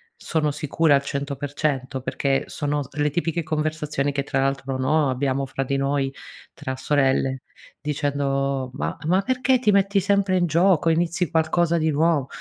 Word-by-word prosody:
Sono 155 -3 -1
sicura 150 +1 +1
al 140 - +4
100% 140 -1 -3
perché 135 +1 0
sono 145 0 -2
s 135 - -14
le 150 0 +2
tipiche 170 +2 -1
conversazioni 150 -2 -1
che, 140 0 -1
tra 135 -1 -1
l'altro, 135 -1 -1
no, 140 +2 +2
abbiamo 135 +1 -1
fra 135 +1 -3
di 135 +1 -1
noi, 135 0 0 0.4
tra 130 - -5
sorelle, 135 -1 +1 0.4
dicendo: 140 -2 -1
“Ma 140 - -3
ma 185 +3 +3
perché 255 0 +2
ti 220 -4 +2
metti 200 0 +3
sempre 195 -1 +2
in 175 - +2
gioco, 170 0 +3
inizi 170 0 0
qualcosa 170 +1 +2
di 160 - +1
nuovo?” 155 -2 +2
145 Hz, 160 wpm, -23 LUFS, 135-165 Hz, 0.4 s, al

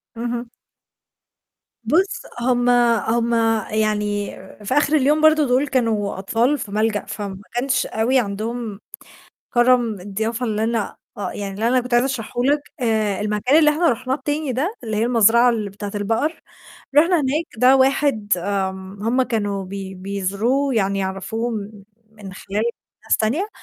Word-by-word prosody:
اهم. 240 0 -4 1.3
بُص، 335 - +1 0.2
هُم 245 0 +1 0.3
هُم 230 +3 0 0.4
يعني 210 -1 0 0.3
في 230 - -1
آخِر 295 +1 +3
اليوم 300 +2 +3
برضه 310 -2 +5
دُول 255 +4 +2
كانوا 220 -7 0
أطفال 230 +8 +1
في 205 - -7
ملجأ، 215 0 0
فما 200 -2 -6
كانش 255 +2 0
أوي 245 +4 +1
عندهم 215 0 -4 0.8
كرم 240 -4 +3
الضيافة 220 +5 -3
اللي 215 -1 -1
أنا 225 -3 -2 0.2
آه، 205 - -3
يعني 200 -1 -5
اللي 220 +4 0
أنا 255 +1 +3
كنت 250 0 -3
عايزة 245 +2 +4
أشرحه 245 -2 -3
لك، 290 +2 +3 0.2
آآ 215 -4 0
المكان 210 +7 +1
اللي 300 -2 +5
إحنا 325 +3 +2
رُحناه 255 +2 -1
التاني 290 -1 -2
ده 305 - -1
اللي 220 -2 -3
هي 215 - +2
المزرعة 235 0 +5
ال 220 -3 -2
بتاعة 200 +1 -7
البقر، 225 +10 -1 0.6
رُحنا 335 +4 +5
هناك 295 +4 -1
ده 255 +3 +6
واحد 265 -5 +1
آمم 190 +1 -3
هم 245 +4 +2
كانوا 205 -5 -2
بي 190 0 -7
بيزوروه 200 +8 -1
يعني 200 -2 +1
يعرفوه 195 +5 -3
م 210 -2 -6 0.3
من 205 -3 -10
خلال 200 +2 -3 0.4
ناس - - +2
تانية، 280 - 0
225 Hz, 150 wpm, -21 LUFS, 205-255 Hz, 1.3 s, ده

